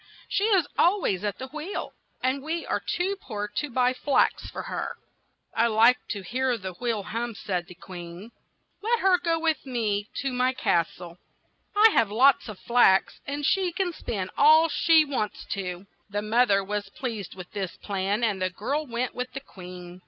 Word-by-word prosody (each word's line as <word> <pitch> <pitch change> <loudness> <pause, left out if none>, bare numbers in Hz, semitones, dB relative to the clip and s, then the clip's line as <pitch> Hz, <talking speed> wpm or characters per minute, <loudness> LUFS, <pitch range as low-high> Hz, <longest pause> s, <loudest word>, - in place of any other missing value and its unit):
She 405 - +1
is 390 -7 +4
al 370 +5 +5
ways 195 - -1
at 205 -1 -2
the 260 - -7
wheel, 305 +7 -5 0.3
and 260 +2 +1
we 325 +3 -3
are - - -1
too 375 +3 -1
poor 210 -4 -4
to 295 - -1
buy 250 0 +2
flax 275 +2 +1
for - - -6
her." - - -4 0.6
"I 230 +1 +3
like 230 +3 +5
to 200 -2 -4
hear 250 +5 0
the 190 -3 -6
wheel 225 +1 -2
hum," 230 +3 -4
said 180 -4 -3
the 180 - -12
queen. 175 +4 -9 0.5
"Let 460 +3 +1
her 370 -2 +4
go 335 -2 +1
with 320 -3 0
me 220 -5 -1
to 270 -2 -1
my 250 +1 +2
cas 170 -9 +2
tle; 175 -1 -11 0.6
I 430 +2 +7
have 230 - +3
lots 250 +3 +4
of 210 - -7
flax, 235 -5 +3
and 285 +1 -3
she 375 +2 +2
can 355 0 -1
spin 190 - -4
all 315 +3 +7
she 320 0 +4
wants 250 -8 -3
to." 180 -1 -5 0.2
The 205 +1 -2
moth 235 +3 +3
er 195 -1 +3
was 205 0 -3
pleased 220 -6 -5
with 180 -1 -10
this 195 -3 -4
plan, 200 +2 -2
and 205 -4 0
the 185 - +1
girl 275 +11 -3
went 240 +1 -2
with 250 0 -4
the 270 - -4
queen. 180 -6 -11
235 Hz, 190 wpm, -26 LUFS, 195-285 Hz, 0.6 s, I